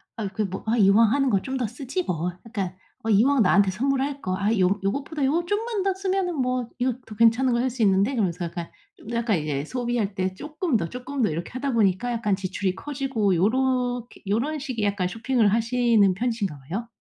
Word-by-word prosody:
아 215 -3 -3
그 215 - -2
뭐 190 0 -6
아 225 +2 +1
'이왕 210 +1 +5
하는 275 -2 +2
거 195 -4 +2
좀 265 +4 -3
더 245 -4 -1
쓰지 270 - -4
뭐. 175 - -2 0.2
약간 195 -5 -3 0.3
어 225 - -2
이왕 235 +5 +4
나한테 195 +1 +4
선물할 275 +6 -1
거 185 0 -1
아 200 +2 0
요 190 +2 +3
요것보다 280 +8 -2
요거 330 +6 +1
좀만 420 +1 -1
더 390 0 +1
쓰면은 380 -2 -1
뭐 250 -2 0
이거 250 0 +1
더 215 - -10
괜찮은 230 +3 +4
거 235 - +1
할 255 +2 +1
수 245 -1 -2
있는데.' 200 +5 +3
그러면서 180 -6 -1
약간 170 0 -6 0.3
좀 - - -11
약간 235 -4 +1
이제 145 -2 -2
소비할 240 -2 -2
때 185 0 -1
쪼끔 300 - -3
더, 170 -5 -3
쪼끔 255 +2 -5
더 210 - +3
이렇게 165 +3 -4
하다 260 +1 -2
보니까 215 +2 +2
약간 210 -4 0
지출이 190 0 -2
커지고 260 -6 -1
요렇게 245 +4 0
요런 250 +10 0
식의 255 -7 -3
약간 200 -3 0
쇼핑을 230 0 +1
하시는 230 -4 +3
편이신가 225 -8 -2
봐요. 185 - -5
230 Hz, 390 characters per minute, -25 LUFS, 195-265 Hz, 0.3 s, 이왕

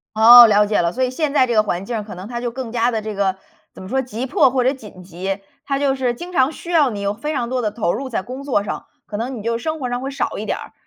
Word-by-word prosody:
哦， 235 +2 +10
了 210 -1 +4
解 210 - 0
了。 170 0 0
所 260 - -2
以 250 - +1
现 290 +2 -2
在 260 -3 +4
这 240 - -1
个 215 - +5
环 190 -2 -3
境 235 +2 -4
儿， 215 - -3
可 210 - -9
能 185 +4 -9
它 240 -1 -4
就 245 - -2
更 255 -2 -6
加 240 +1 +1
地 220 -1 -2
这 215 -1 -5
个 190 -1 0 0.4
怎 - - -11
么 185 - -9
说， 265 +3 0
急 250 0 -5
迫 260 - +4
或 255 0 +1
者 260 - +2
紧 210 -9 -12
急， 190 +2 -5 0.3
它 275 -1 0
就 275 -1 +1
是 250 -2 0
经 355 +8 -9
常 270 -1 +2
需 345 - -9
要 300 -6 +4
你 205 - -5
有 200 0 -1
非 300 +7 -4
常 240 -3 -2
多 255 -1 -1
地 215 -3 -1
投 190 -7 -1
入 265 +4 -4
在 225 - -2
工 255 +6 -8
作 240 -8 +1
上， 205 - -6 0.2
可 205 - -5
能 245 +3 -4
你 210 - -7
就 230 +1 -1
生 315 +4 -4
活 250 - -2
上 245 - -2
会 270 +1 -4
少 275 - -3
一 - - -5
点 - - -1
儿。 - - -11
240 Hz, 340 characters per minute, -20 LUFS, 210-265 Hz, 0.4 s, 哦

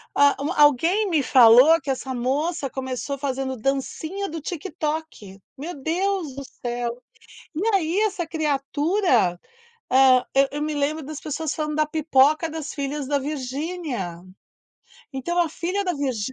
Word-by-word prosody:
ah, 285 0 +5 0.3
alguém 335 - +4
me 310 -5 +2
falou 255 +6 +7
que 275 - -7
essa 265 0 -2
moça 275 +5 -1
começou 260 +2 -4
fazendo 265 -1 -3
dancinha 295 - -3
do 320 +1 -5
TikTok. 305 - -5 0.2
Meu 320 +6 -6
Deus 345 -2 -1
do 275 - -6 0.2
céu! 240 -1 -2 0.6
E 315 - -3
aí 355 +1 +1
essa 400 -5 0
criatura, 295 - +1 0.5
ah, 260 -1 +5
eu 275 0 +4
eu 295 - -3
me 305 - -2
lembro 295 +2 -1
das 300 +1 -7
pessoas 310 0 -3
falando 300 -1 -3
da 310 0 +2
pipoca 310 +1 +3
das 315 -1 -6
filhas 280 0 -4
da 285 0 +1
Virginia. 275 - -4 1.0
Então 310 +7 -3
a 345 - +3
filha 365 +6 -3
da 360 - 0
Virgi 260 -5 -2
295 Hz, 145 wpm, -23 LUFS, 265-325 Hz, 1.0 s, falou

